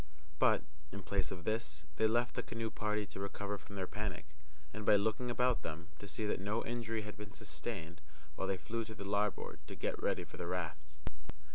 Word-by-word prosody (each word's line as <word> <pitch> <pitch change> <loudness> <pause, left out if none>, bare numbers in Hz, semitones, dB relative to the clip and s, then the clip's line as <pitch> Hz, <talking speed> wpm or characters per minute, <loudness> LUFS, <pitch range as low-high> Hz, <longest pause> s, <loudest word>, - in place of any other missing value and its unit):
But, - - +6 0.3
in 100 -1 -5
place 95 -3 +2
of 90 -2 -4
this, 80 -9 0
they 110 - +6
left 120 +2 +3
the - - +2
canoe 115 -1 -2
party 105 -1 +1
to 95 - -7
recover 100 +1 -1
from 100 - -10
their 95 -1 0
panic, 100 -5 -2 0.5
and, 110 - -3
by 105 - +8
looking 110 +4 +3
about 125 0 +4
them, 85 +3 -4
to 100 - -6
see 110 +2 -1
that 105 - +1
no 105 +4 +1
injury 115 -2 0
had 105 0 -6
been 105 -2 -7
sustained, 85 0 -4 0.3
while 95 - 0
they 95 -1 +2
flew 115 +5 -1
to 110 - -6
the 100 - -5
larboard 105 0 +1
to - - -5
get - - 0
ready - - +2
for - - -10
the 85 - -2
rafts. 80 -4 -2
105 Hz, 210 wpm, -37 LUFS, 90-110 Hz, 0.5 s, by